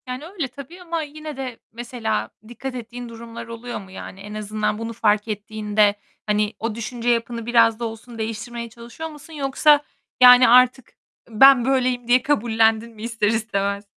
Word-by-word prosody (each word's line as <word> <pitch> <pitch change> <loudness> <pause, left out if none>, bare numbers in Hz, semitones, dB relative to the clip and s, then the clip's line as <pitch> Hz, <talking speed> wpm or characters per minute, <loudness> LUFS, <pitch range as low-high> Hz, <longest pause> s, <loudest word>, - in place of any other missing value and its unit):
Yani, 255 +4 -6
öyle 340 -5 -4
tabii 280 +8 -12
ama 335 -2 -3
yine 305 0 -8
de 255 -3 -5 0.2
mesela 225 - -3 0.2
dikkat 250 +3 -7
ettiğin 240 0 -7
durumlar 230 0 -9
oluyor 230 +1 -6
mu? 190 -2 -13
Yani, 190 0 -9
en 205 +1 -9
azından 215 0 -2
bunu 230 +1 -5
fark 210 -1 +1
ettiğinde, 210 -1 0 0.3
hani, 210 0 +1
o 225 -1 -3
düşünce 235 +1 -3
yapını 230 -1 -1
biraz 230 -1 +4
da 235 - -2
olsun 230 +1 -8
değiştirmeye 230 +2 -5
çalışıyor 235 +8 -9
musun 305 +1 -13
yoksa, 290 +1 +3 0.4
yani, 250 0 +9
artık 250 +1 +4 0.4
ben 245 +2 +6
böyleyim 255 -2 0
diye 250 +1 +5
kabullendin 225 -4 +2
mi 215 - -10
ister 225 -2 -1
istemez? 200 -2 -1
235 Hz, 165 wpm, -22 LUFS, 220-255 Hz, 0.4 s, yani